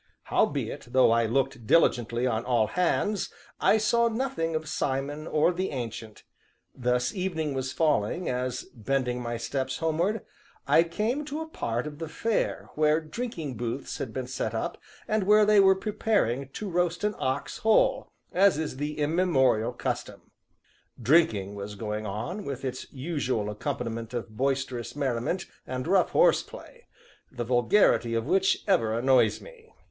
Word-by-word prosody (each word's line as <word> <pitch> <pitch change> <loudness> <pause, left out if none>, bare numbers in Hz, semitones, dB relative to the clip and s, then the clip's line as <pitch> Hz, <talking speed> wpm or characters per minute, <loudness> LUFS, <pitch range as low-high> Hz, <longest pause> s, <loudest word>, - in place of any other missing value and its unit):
Howbeit, - - -1
though 130 -3 +5
I 115 0 +3
looked 130 -1 -1
diligently 120 -6 +3
on 115 -2 0
all 120 -3 +2
hands, 180 - 0 0.3
I 220 - +4
saw 235 +2 +3
nothing 225 -9 -1
of 155 0 -3
Simon 145 +2 -2
or 155 +4 +2
the 185 +2 -2
Ancient; 115 -4 -6 0.5
thus 125 -1 0
evening 165 -6 -2
was 130 0 -2
falling 150 - +1
as, 125 0 -2
bending 125 +1 -1
my 120 -1 -3
steps 130 +3 -3
homeward, 170 +7 0 0.4
I - - +5
came 215 - -1
to 300 +2 -4
a 320 - -5
part 120 - -3
of 150 0 -7
the 165 -2 -5
Fair 225 +6 -1
where 155 0 +3
drinking 160 - -5
booths 120 +3 -4
had 125 - -4
been 130 +2 -4
set 120 -3 -3
up, 110 - -3 0.3
and 215 0 +1
where 210 +1 +6
they 210 0 +5
were 190 -1 +6
preparing 190 - 0
to 215 - -5
roast 175 -1 0
an 210 0 +1
ox 130 +2 -2
whole, 220 0 +3 0.2
as 195 -2 +4
is 155 -4 -3
the 150 +2 -3
immemorial 145 -8 +2
custom. 120 - -5 0.7
Drinking 115 - +3
was 100 0 -6
going 105 0 -4
on, 115 - -4
with 135 -3 -5
its 130 -1 -5
usual 130 -7 -2
accompaniment 115 0 -4
of 115 -2 -5
boisterous 130 -1 -2
merriment 140 +5 -1 0.2
and 130 0 -3
rough 185 +1 +3
horseplay - - +1 0.4
the 120 -2 -4
vulgarity 120 - +3
of 115 0 -1
which 190 +5 +2
ever 115 - +2
annoys 125 -2 +3
me. 460 -2 -15
140 Hz, 155 wpm, -27 LUFS, 120-180 Hz, 0.7 s, where